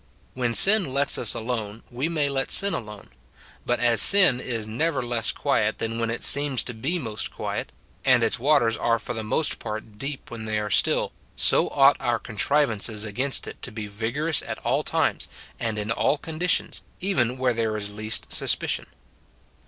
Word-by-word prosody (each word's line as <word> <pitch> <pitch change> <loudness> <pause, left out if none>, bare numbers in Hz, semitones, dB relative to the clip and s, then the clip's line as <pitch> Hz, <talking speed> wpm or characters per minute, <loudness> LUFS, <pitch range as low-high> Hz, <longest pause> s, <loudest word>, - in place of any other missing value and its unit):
When 120 -2 -2
sin 195 -7 +6
lets 140 0 +5
us 115 - +1
alone 115 -2 -5
we 130 +7 -3
may 155 -4 -1
let 135 -1 -3
sin 200 0 +4
alone; 105 -3 -8 0.6
but 120 -1 0
as 120 -2 +3
sin 185 -11 +6
is 115 -4 -4
never 140 +6 -2
less 120 -2 -1
quiet 110 -6 -1
than 115 +1 -4
when 115 0 -2
it 115 - -3
seems 140 -4 +5
to 125 - -5
be 135 +11 -3
most 110 -9 -3
quiet, - - -5 0.3
and 130 -3 +3
its 115 +1 0
waters 120 -4 +2
are 115 +1 0
for 120 +2 -6
the 110 -2 -5
most 145 +8 0
part 110 -1 -8
deep 140 +2 -6
when 115 -2 -7
they 110 0 -2
are 105 0 -4
still, - - +2 0.2
so - - +2
ought 140 0 +4
our 120 -3 -1
contrivances 110 -2 -1
against 130 +6 0
it - - -10
to 125 - -5
be 110 -1 -6
vigorous 115 +10 -1
at - - -6
all - - +1
times - - -1 0.3
and 110 -2 -3
in 105 +1 -3
all 145 - +1
conditions, 165 +4 -2 0.2
even 130 - -1
where 130 -1 0
there 110 -2 -2
is 105 -1 -5
least 110 +1 -3
suspicion. - - 0
120 Hz, 185 wpm, -24 LUFS, 110-140 Hz, 0.6 s, sin